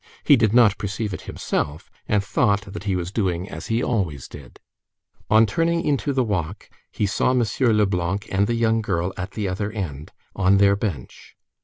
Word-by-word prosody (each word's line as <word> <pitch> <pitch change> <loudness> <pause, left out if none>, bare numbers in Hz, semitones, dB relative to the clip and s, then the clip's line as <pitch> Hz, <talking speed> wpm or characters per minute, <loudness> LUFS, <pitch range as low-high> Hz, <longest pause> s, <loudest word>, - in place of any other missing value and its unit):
He 145 - +6
did 115 -4 +2
not 115 -3 +4
perceive 105 +1 -3
it - - -6
himself, 75 +2 -3 0.2
and 105 -1 +1
thought 100 +1 +1
that 105 -1 -7
he 100 -2 0
was 90 0 -3
doing 95 -4 -1
as 80 -4 -8
he 115 +2 0
always 90 - -2
did. 70 -4 -13 0.7
On 110 +1 +6
turning 165 +9 0
into 145 0 0
the 130 -2 +1
walk, 95 -3 -3 0.2
he 105 - -1
saw 100 - +1
M. 125 -2 +3 0.3
Leblanc 95 -1 0
and 100 +2 +2
the 120 - 0
young 115 -1 +2
girl 90 -3 -1
at 90 - -6
the 105 -3 -2
other 100 +3 -3
end, 80 -9 -6 0.2
"on 95 +1 +3
their 100 0 +5
bench." 95 - -6
100 Hz, 185 wpm, -23 LUFS, 90-110 Hz, 0.7 s, He